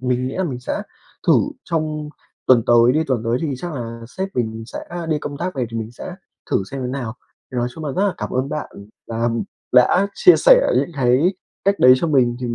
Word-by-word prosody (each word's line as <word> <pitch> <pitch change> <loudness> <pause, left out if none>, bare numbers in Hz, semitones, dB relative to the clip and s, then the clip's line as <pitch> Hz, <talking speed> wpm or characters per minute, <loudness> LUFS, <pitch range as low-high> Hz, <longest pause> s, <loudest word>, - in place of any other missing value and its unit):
mình 125 0 0
nghĩ 130 - -6
là 190 - 0
mình 130 -7 -4
sẽ 125 - -3 0.4
thử - - +6 0.3
trong 155 -2 -2 0.4
tuần 120 -3 +6
tới 120 +1 +5
đi, 155 +3 +1
tuần 130 -6 0
tới 115 +2 +1
thì 150 -4 -1
chắc 175 +6 -6
là 115 -4 -6
sếp 190 +9 -4
mình 115 -2 -2
sẽ - - -7 0.3
đi 155 -2 +1
công 145 -1 -6
tác 180 +3 -3
về, 130 -3 -1
thì 115 - -4
mình 110 0 -5
sẽ - - -8 0.4
thử - - +3
xem 135 - -5
thế 125 - -3
nào. 125 -3 -4 0.4
Thì - - -5
nói 120 0 0
chung 160 - -7
là 145 - -3
rất 185 - 0
là 195 - -1
cảm 105 - -4
ơn 130 +2 -1
bạn 150 +1 -4 0.4
là, 115 0 -4
ừm, 115 -1 0 0.3
đã 130 +10 +5
chia 360 - +6
sẻ - - +5
những - - +1
cái 135 +8 +3 0.3
cách 200 0 +2
đấy 125 0 +8
cho 150 - -1
mình, 130 -6 +2
thì 125 - -2
mình 120 - -2
130 Hz, 245 wpm, -20 LUFS, 120-155 Hz, 0.4 s, đấy